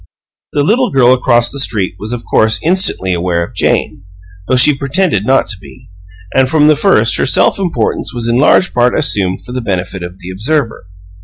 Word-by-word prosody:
The 145 - 0
little 245 - +1
girl 130 -2 +3
across 120 -2 +1
the 140 - -3
street 105 -8 0
was 105 +3 -6
of 120 -1 -6
course 110 0 +1
instantly 165 - +2
aware 85 -1 -1
of - - -16
Jane, - - -1 0.4
though 130 - +1
she 140 +3 +5
pretended 140 - -1
not 135 +1 +2
to 105 - -6
be; 70 +3 -17 0.4
and 130 -1 +2
from 150 0 +2
the 155 - +4
first 195 +7 +2
her - - 0
self - - +2
importance 165 - -2
was 120 -1 -3
in 120 +1 +1
large 150 +7 +2
part 125 0 +1
assumed 95 -11 0
for - - -10
the 125 0 -4
benefit 95 -3 -4
of 90 +1 -8
the 90 -1 -9
observer. 115 +1 -2
120 Hz, 200 wpm, -12 LUFS, 95-145 Hz, 0.4 s, she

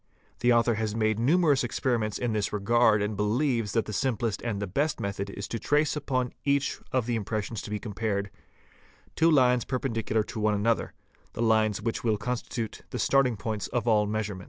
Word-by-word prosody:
The 120 +1 +3
author 120 0 +4
has 110 -1 -2
made 110 -1 +1
numerous 145 +2 +3
experiments 115 -2 -1
in 120 -2 -1
this 105 -2 -1
regard 105 0 +3
and 105 +1 -2
believes 115 +1 0
that 115 - +1
the 105 - -6
simplest 115 -3 -1
and 115 -4 -2
the 100 - -2
best 145 - -1
method 100 0 -3
is 100 0 -6
to 115 - -3
trace 150 +5 +1
upon 130 -4 -1
each 140 0 +1
of 130 -3 +1
the 120 0 -1
impressions 110 0 -3
to - - -8
be 105 - -2
compared, 105 -2 -3 0.8
_two 165 +1 +4
lines 125 -4 +4
prependicular 115 -4 -1
to 110 - -6
one 105 0 +2
another, 115 +3 0 0.4
lines 110 -2 +2
which 115 - -2
will 110 -3 +2
constitute 115 0 -4
the - - -4
starting 135 -5 +2
point 105 0 -3
of 120 -1 -1
all 105 -2 +3
measurements. 105 -2 -3
115 Hz, 185 wpm, -27 LUFS, 105-125 Hz, 0.8 s, author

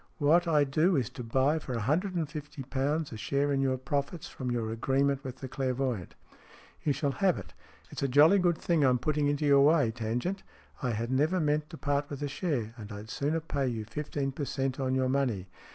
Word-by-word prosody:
What 165 +4 +4
I 150 -3 +4
do 155 +6 +2
is 125 -4 0
to 125 - -7
buy 135 +7 +2
for 130 - -6
a 115 - -1
hundred 175 - 0
and 165 -3 0
fifty 150 -2 -7
pounds 140 +4 -1
a 110 - -6
share 140 +6 0
in 135 - +1
your 130 -1 +1
profits 140 +5 -3
from 130 -2 -5
your 115 -2 -1
agreement 135 +4 +1
with 130 -2 -6
the 130 0 -7
clairvoyant." 130 - -2 0.7
"You 150 - +2
shall 140 +1 0
have 190 +4 +2
it. - - -9 0.4
It's - - -6
a 140 - +2
jolly 150 +9 +6
good 175 -2 +2
thing 165 -3 +1
I'm 130 -2 +4
putting 150 +3 0
into 145 +1 0
your 140 -1 +6
way, 145 -5 +4
Tangent. 120 - -2 0.4
I 130 - 0
had 115 +1 -2
never 155 +8 +2
meant 150 -1 0
to 160 - -9
part 145 -1 -1
with 145 0 -5
a - - 0
share, 140 - -2
and 110 -1 -9
I'd 105 +2 -8
sooner 150 +4 0
pay 140 -4 -1
you 115 -3 -3
fifteen 140 +3 -3
per 140 +2 -4
cent, 135 0 -2
on 130 -1 0
your 130 0 +2
money. 130 -8 0
140 Hz, 220 wpm, -30 LUFS, 130-150 Hz, 0.7 s, jolly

